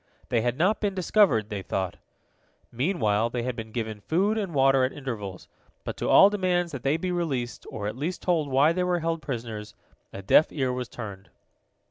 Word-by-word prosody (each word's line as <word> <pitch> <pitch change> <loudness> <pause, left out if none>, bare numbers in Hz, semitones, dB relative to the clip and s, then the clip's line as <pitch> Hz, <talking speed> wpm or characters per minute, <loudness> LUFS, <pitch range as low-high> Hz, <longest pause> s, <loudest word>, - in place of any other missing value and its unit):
They 115 - +2
had 120 +2 -1
not 190 +6 +2
been 200 -2 -1
discovered, 185 - +3
they 105 -3 -4
thought. 95 -1 -3 0.7
Meanwhile 115 - +1
they 120 0 -3
had 125 0 -2
been 110 -2 -7
given 110 -2 -4
food 190 - +1
and 205 -5 -2
water 135 -2 +4
at 130 - +1
intervals, 105 -10 -6 0.4
but - - -5
to - - -2
all 200 - +8
demands 180 -4 0
that 135 -4 -6
they 140 +4 +1
be 180 +2 -3
released, 140 -9 -3
or 105 - -5
at 105 +1 -3
least 155 +8 -4
told 165 -5 +1
why 140 +5 +4
they 180 +1 0
were 180 -1 0
held 165 0 -1
prisoners, 115 -6 -6 0.4
a 95 - -8
deaf 150 +10 +5
ear 130 -4 -1
was 125 -1 -4
turned. 100 -5 -8
135 Hz, 195 wpm, -26 LUFS, 110-175 Hz, 0.7 s, all